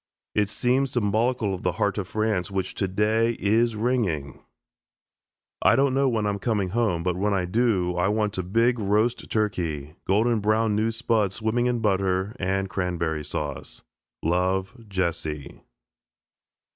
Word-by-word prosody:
It 105 -1 +1
seems 130 +4 +1
symbolical 110 -1 +1
of 95 - -5
the 90 - 0
heart 100 +5 0
of 95 - -4
France, 110 -3 -1
which, 95 -2 -2
today, 105 +4 +1
is 115 +3 +2
ringing. 105 - -1 1.2
I - - +5
don't 135 -1 +3
know 135 0 +3
when 110 -3 0
I'm 100 -1 -1
coming 105 -3 0
home, 95 -5 0
but 90 -1 0
when 100 +2 +1
I 90 -2 0
do, 95 -3 +1
I 90 +2 +1
want 105 -1 0
a - - +2
big 115 +7 +2
roast 105 +4 +1
turkey, 85 -9 -2
golden 110 +4 +3
brown, 110 +1 +2
new 110 +2 +1
spuds 110 -4 0
swimming 110 +2 0
in 120 -2 0
butter 95 0 0
and 95 +1 0
cranberry 85 -5 -2
sauce. 70 -1 -5 0.4
Love, 95 +3 0 0.2
JESSE. 80 -6 -3
105 Hz, 145 wpm, -25 LUFS, 90-115 Hz, 1.2 s, I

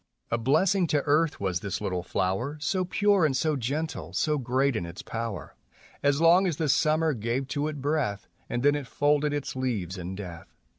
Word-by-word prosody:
A 115 - +2
blessing 175 - +3
to 145 -3 +1
earth 155 +2 +2
was 95 -3 -1
this 100 -1 -3
little 90 -1 -2
flower, 95 - -1
So 185 +5 0
pure 200 0 +3
and 140 -4 +2
so 155 +2 +1
gentle, 145 +6 -3
so 150 -2 +1
great 130 +1 +1
in 85 - -1
its 85 +1 -8
power, 115 -4 -5 0.5
As 140 0 +2
long 175 +4 +5
as 165 -5 -1
the 160 -3 0
summer 155 +2 +3
gave 120 +3 -2
to 145 +1 -1
it 150 -3 -5
breath, 140 -9 -1 0.2
And 120 - -2
then 145 0 +5
it 145 -3 -3
folded 145 +1 +2
its 145 -2 -3
leaves 105 -9 -2
in 90 +2 -5
death. 90 -4 -9
140 Hz, 195 wpm, -27 LUFS, 115-155 Hz, 0.5 s, long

